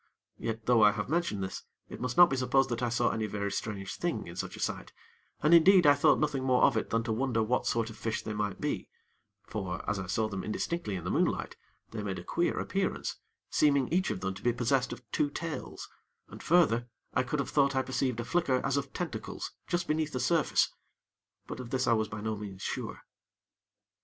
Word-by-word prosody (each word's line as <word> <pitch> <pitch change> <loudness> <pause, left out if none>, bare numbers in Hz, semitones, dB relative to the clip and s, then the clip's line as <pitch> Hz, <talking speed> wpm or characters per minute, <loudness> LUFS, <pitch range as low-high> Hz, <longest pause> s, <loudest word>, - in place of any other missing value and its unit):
Yet, 110 0 -4
though 120 -2 +4
I 105 -1 +7
have 105 +3 -4
mentioned 160 - 0
this, 95 - -5 0.3
it - - -9
must 125 -1 -3
not 175 -3 +8
be - - +2
supposed 130 +1 +2
that 120 0 -2
I 120 - +1
saw 120 - +2
any 110 -1 -1
very 100 -1 -3
strange 100 -2 -4
thing - - -2
in - - -9
such - - -5
a - - -11
sight, - - -3 0.5
and 155 +2 +5
indeed, 180 +1 +7
I 145 - +8
thought 145 - +4
nothing 145 -3 0
more 130 -1 +3
of - - +5
it 110 - -1
than 115 0 +1
to 115 -1 -1
wonder 115 -1 +1
what 125 +3 0
sort 115 -1 0
of - - -12
fish 110 -1 -2
they 110 - -4
might 105 -2 -2
be; - - -2 0.6
for, 95 -4 -5
as 105 -2 0
I 95 - -5
saw 110 +5 0
them 95 -3 -5
indistinctly 110 - -2
in 90 - -5
the 90 - -2
moonlight, - - 0 0.4
they 110 - -4
made 95 -2 -3
a 90 - -7
queer 170 - 0
appearance, 195 -1 -2 0.3
seeming 140 -3 +3
each 185 +4 +1
of 95 - -3
them 95 0 -2
to - - -11
be 120 - +2
possessed 125 +2 +1
of 120 - -7
two 145 - +1
tails, 165 +2 -5 0.4
and - - -10
further, 135 -9 +3 0.3
I - - +3
could 130 +4 -2
have 140 -3 -2
thought 140 -2 +3
I 130 - +2
perceived 130 -2 -1
a 120 - -3
flicker 155 -1 +1
as 140 0 +1
of 140 -1 -3
tentacles 115 -11 -5 0.2
just 175 0 -1
beneath 155 -1 0
the 130 - -1
surface; 155 +5 +2 0.7
but - - -7
of 125 -2 -7
this 130 +1 0
I - - +4
was 110 -1 +1
by 105 0 -6
no 110 0 -2
means 100 -2 -8
sure. - - -4
120 Hz, 225 wpm, -30 LUFS, 110-140 Hz, 0.7 s, not